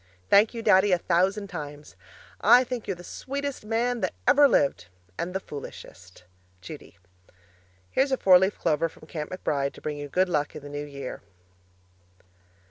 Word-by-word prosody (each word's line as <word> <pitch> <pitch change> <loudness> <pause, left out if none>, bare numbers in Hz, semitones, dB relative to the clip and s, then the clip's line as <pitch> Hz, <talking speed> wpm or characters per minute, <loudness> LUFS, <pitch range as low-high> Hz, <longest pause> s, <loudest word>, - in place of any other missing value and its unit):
Thank 210 +4 +5
you, 230 - -5
Daddy, 205 -2 +5
a - - +4
thousand 190 +4 +1
times. 150 -4 -8 0.5
I 250 +1 +7
think 245 -2 -5
you're 195 - -2
the 175 - -12
sweetest 280 +7 -5
man 235 +2 0
that - - -2
ever 290 0 +7
lived 135 - +1 0.3
and 170 - -4
the - - +1
foolishest! 90 - -11 0.4
Judy 90 -1 -11 0.9
Here's 270 +1 +1
a 265 - +2
four 185 -5 +6
leaf 190 +2 0
clover 165 0 0
from 155 - -17
Camp 150 -2 -5
McBride 140 -6 -2
to - - -14
bring 150 -1 -4
you 145 0 -6
good 185 +5 +2
luck 150 -4 -1
for - - -7
the 145 0 -11
New 145 0 -5
Year. 140 -2 -7
180 Hz, 170 wpm, -26 LUFS, 145-220 Hz, 0.9 s, I